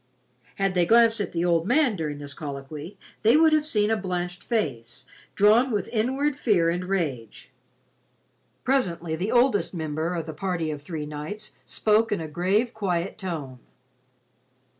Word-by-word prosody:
Had 195 -1 0
they 175 -2 +2
glanced 230 0 +5
at - - -3
the 170 0 -1
old 170 0 +2
man 255 -2 +3
during 150 -4 -3
this 145 -1 -7
colloquy, 150 +5 -7 0.2
they 225 +6 +5
would 320 0 +5
have 305 -1 +3
seen 210 -6 +2
a - - +3
blanched 180 -3 -4
face, 130 - -3 0.3
drawn 220 +6 +5
with 205 -5 -1
inward 265 +6 0
fear 195 - +2
and 180 +2 -3
rage. 145 - -3 1.1
Presently 175 -11 0
the 185 +6 -2
oldest 240 -6 +2
member 160 +2 -2
of 165 -2 -3
the 160 - -6
party 165 -1 -2
of 150 -1 -6
three 150 0 -5
knights 150 +9 -6 0.2
spoke 220 +1 +2
in 205 - 0
a 160 - -5
grave 195 +10 0
quiet 190 -3 -2
tone. 155 -10 -5
180 Hz, 160 wpm, -25 LUFS, 160-220 Hz, 1.1 s, glanced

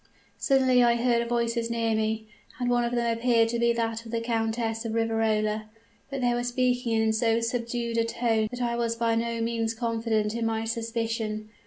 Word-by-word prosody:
"Suddenly 260 -2 +4
I 235 0 +4
heard 235 -1 +1
voices 235 -1 0
near 230 -1 0
me; 220 0 -1 0.3
and 245 -1 0
one 240 0 +3
of 235 - -1
them 240 0 +1
appeared 230 -1 +3
to 235 0 -1
be 235 0 +3
that 225 -1 -2
of 225 - -10
the 230 - 0
Countess 225 0 -1
of 225 -1 -3
Riverola 220 -1 0 0.4
but 275 -1 -4
they 245 -1 +2
were 240 0 -1
speaking 245 -1 0
in 220 0 +2
so 225 +1 +2
subdued 235 0 -2
a - - +3
tone 230 -1 0
that 245 +1 -4
I 235 0 0
was 230 -1 0
by 230 0 +1
no 230 0 -1
means 230 0 -1
confident 225 -2 0
in 235 0 -2
my 225 0 -1
suspicion. 225 -1 -3
230 Hz, 195 wpm, -27 LUFS, 225-235 Hz, 0.4 s, Suddenly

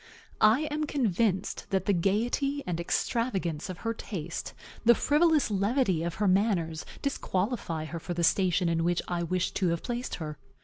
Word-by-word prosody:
I 220 +6 +6
am 305 +1 -1
convinced 220 - 0
that 190 -1 0
the 200 - +3
gayety 240 - 0
and 170 -2 -2
extravagance 185 -3 -1
of 180 - -7
her 230 - +1
taste, 175 -7 -6 0.3
the 235 +1 +7
frivolous 300 -2 +3
levity 200 - +1
of 170 0 -3
her 205 0 +1
manners, 185 -5 +1 0.2
disqualify 190 - -1
her 165 +1 -5
for 175 +2 -5
the 170 - -1
station 180 +1 +3
in 165 0 +1
which 175 0 +1
I 175 -1 -1
wished 175 +1 -1
to 190 - +1
have 170 -1 -1
placed 245 +1 -3
her. 150 -3 -6
190 Hz, 170 wpm, -29 LUFS, 170-235 Hz, 0.3 s, the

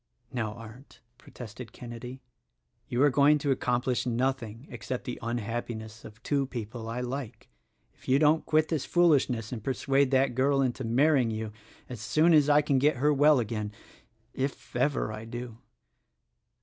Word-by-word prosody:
"Now, 110 -4 -2
Arndt," 115 +4 -13 0.2
protested 115 -1 -10
Kenedy, 125 +2 -9 0.7
"you 120 +3 +1
are 145 - +5
going 145 +3 +5
to 145 -1 -1
accomplish 125 -1 0
nothing 120 -1 -2
except 120 +2 -5
the 125 - -6
unhappiness 115 -1 -4
of 110 +2 -13
two 140 -2 0
people 115 -2 -6
I 120 +2 -3
like, 125 -3 -6 0.4
if - - -22
you 130 - +4
don't 155 +2 +3
quit 155 0 +2
this 155 -5 -1
foolishness 140 -10 +2
and 115 -5 -5
persuade 135 +2 +1
that 130 -1 +2
girl 135 +3 +2
into 130 0 -2
marrying 130 +2 +3
you 110 -1 -4 0.4
as 120 -4 -8
soon 160 +8 +3
as 150 -2 +5
I 150 0 +5
can 140 -2 +2
get 145 +1 +2
her 150 +4 +3
well 145 +1 +5
again 105 -2 -3 0.4
— - - -44 0.2
if 135 -1 -4
ever 125 -3 0
I 110 0 -7
do." 120 0 -7
125 Hz, 160 wpm, -28 LUFS, 115-140 Hz, 0.7 s, are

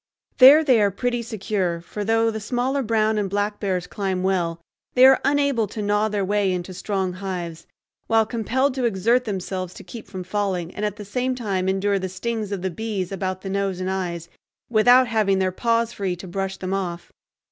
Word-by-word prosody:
There 280 +5 +9
they 255 -7 +4
are 205 - +4
pretty 240 +5 -2
secure, 200 -6 -2
for 205 +5 -6
though 225 +1 +2
the 220 - -4
smaller 250 +5 -1
brown 220 -2 +1
and 200 -2 -1
black 205 +1 -1
bears 185 -3 -1
climb 190 -2 -3
well, 175 -3 0 0.4
they 255 0 +8
are 265 0 +6
unable 280 -5 +2
to 215 - -8
gnaw 205 +1 +2
their 205 -2 -1
way 205 -1 +1
into 180 0 -4
strong 190 0 -2
hives, 180 -3 -6 0.4
while 225 -1 +3
compelled 255 +5 0
to 255 -2 -1
exert 230 +4 +2
themselves 185 -3 -4
to - - -10
keep 230 -3 -10
from 185 -2 -6
falling 185 -3 -2
and 205 - -5
at 210 -1 -2
the 210 -1 -9
same 250 +5 -1
time 195 -6 -1
endure 195 +1 +1
the 190 0 -4
stings 215 +2 -4
of 195 -3 -3
the 190 - -1
bees 200 -2 -4
about 185 -1 -3
the 195 - -6
nose 195 -2 -1
and 185 0 -2
eyes, 175 -3 -3 0.4
without 245 +3 +6
having 215 -4 +2
their 190 -1 +1
paws 230 +3 0
free 190 -3 -2
to 180 +2 -10
brush 195 +2 -3
them 185 0 -4
off. 175 -3 -4
200 Hz, 200 wpm, -23 LUFS, 185-225 Hz, 0.4 s, There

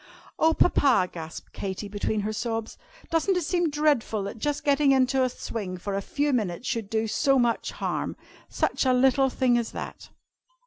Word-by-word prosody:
"Oh, 320 0 +4
Papa!" 265 - +4
gasped 160 -1 -9
Katy, 195 +1 -4
between 205 +1 -2
her 215 +2 -2
sobs, 225 0 -3 0.4
"doesn't 330 +4 +2
it 360 - 0
seem 345 +1 +1
dreadful, 290 -8 +1
that 200 +3 -6
just 290 +5 -2
getting 285 -1 +3
into 265 0 +2
the 255 - +3
swing 205 -6 -5
for 200 +3 -5
a 195 - -1
few 290 +7 -1
minutes 215 -2 -1
should 225 -4 -2
do 220 0 0
so 275 +5 +2
much 240 -2 +1
harm? - - -3 0.3
Such - - 0
a 260 -2 +3
little 265 +1 +4
thing 250 -2 +2
as 230 - -4
that!" - - -7
245 Hz, 180 wpm, -26 LUFS, 210-280 Hz, 0.4 s, Oh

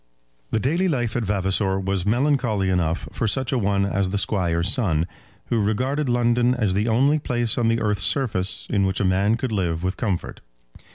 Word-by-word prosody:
The - - 0
daily 165 - +1
life 120 -8 -1
at 120 - 0
Vavasor 95 -1 0
was 95 -1 -2
melancholy 120 -5 +1
enough 85 -2 -1
for 115 - -2
such 130 +4 0
a 130 - +1
one 100 -1 +1
as 100 -1 0
the 100 - -1
Squire's 90 -2 +1
son, 85 - +1 0.4
who 115 -2 +1
regarded 130 +7 0
London 120 +1 +2
as 105 -6 0
the 105 +4 0
only 135 +7 +3
place 120 -5 -1
on 120 -2 +1
the 115 0 +2
earth's 105 -4 -1
surface 105 -3 -1
in 100 -2 +2
which 95 - -2
a 105 - +1
man 100 +4 +2
could 125 0 -3
live 90 -5 -1
with 95 +1 -2
comfort. 100 -7 -3
105 Hz, 190 wpm, -23 LUFS, 95-120 Hz, 0.4 s, only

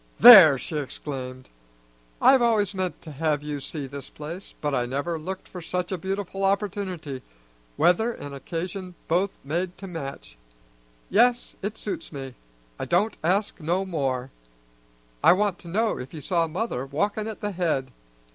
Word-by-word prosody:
"There!" 195 - +11
she 150 +5 -4
exclaimed. 130 -2 -6 0.7
"I've 265 -1 +6
always 215 -4 +2
meant 185 -3 -3
to 160 - -9
have 150 0 0
you 150 -1 -3
see 145 +1 -5
this 135 0 -8
place, 165 +6 -8
but 145 -1 -1
I 125 -2 +1
never 145 +6 -2
looked 185 +4 -6
for 180 - -8
such 180 +2 -3
a 190 - -1
beautiful 195 +1 -3
opportunity 190 -8 -1 0.6
weather 220 +7 +3
an' 145 - -8
occasion 180 +5 -5
both 185 +4 +1
made 175 +6 -2
to 195 - -8
match. 140 - -7 0.7
Yes, 240 +4 +3
it 205 +3 -4
suits 195 -5 -5
me: 135 -3 -6 0.5
I - - -2
don't 200 +6 +2
ask 195 +6 +1
no 175 +4 0
more. 135 -7 -2 0.9
I - - +8
want 200 -1 0
to - - -13
know 215 +6 0
if 130 +6 -8
you 155 - -6
saw 170 +1 +1
mother 175 - -2
walkin' 205 +9 -1
at 220 - -7
the 205 - -2
head! 160 -8 -1
175 Hz, 160 wpm, -25 LUFS, 145-195 Hz, 0.9 s, There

